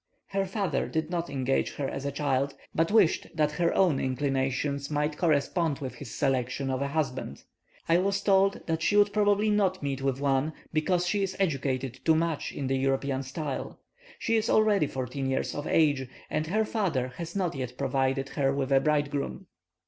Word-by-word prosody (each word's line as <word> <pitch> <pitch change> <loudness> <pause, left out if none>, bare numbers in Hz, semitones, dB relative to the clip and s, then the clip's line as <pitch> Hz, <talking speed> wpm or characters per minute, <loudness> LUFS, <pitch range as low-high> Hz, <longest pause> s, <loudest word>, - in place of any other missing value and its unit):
Her 195 0 -1
father 190 -7 -1
did 160 +1 -2
not 170 -1 -2
engage 135 -1 0
her 140 - -2
as 135 +1 -5
a - - -1
child, 140 -1 0 0.2
but 165 +1 +2
wished 205 -6 +3
that 150 -2 +2
her 170 +2 +1
own 175 -8 +3
inclinations 135 +1 -1
might 150 0 0
correspond 160 -1 +1
with 130 -2 -5
his 145 -5 -9
selection 135 +1 -1
of 130 0 -1
a 140 - 0
husband. 135 - -3 0.4
I 165 +1 +4
was 195 +1 +1
told 195 0 +3
that 165 -1 -1
she 205 - +2
would 205 0 +4
probably 205 0 +3
not 190 -4 +1
meet 140 -1 -2
with 135 -1 0
one, 140 +2 +1 0.2
because 175 +3 +1
she 200 +3 0
is 190 -1 -1
educated 135 -7 -1
too 160 - +4
much 165 -1 -1
in 140 - -4
the 135 0 0
European 135 0 0
style; 135 +1 -5 0.4
she 230 - 0
is 220 - 0
already 210 -7 +4
fourteen 135 +1 -3
years 135 - -1
of 145 - -4
age, 145 -5 +2 0.2
and 155 +1 -1
her 215 +6 +1
father 165 - -1
has 170 +1 -6
not 185 -4 0
yet 125 -2 -5
provided 135 0 0
her 135 -2 +1
with 135 -1 -2
a 135 - +6
bridegroom. 145 -1 -1
145 Hz, 185 wpm, -28 LUFS, 135-175 Hz, 0.4 s, a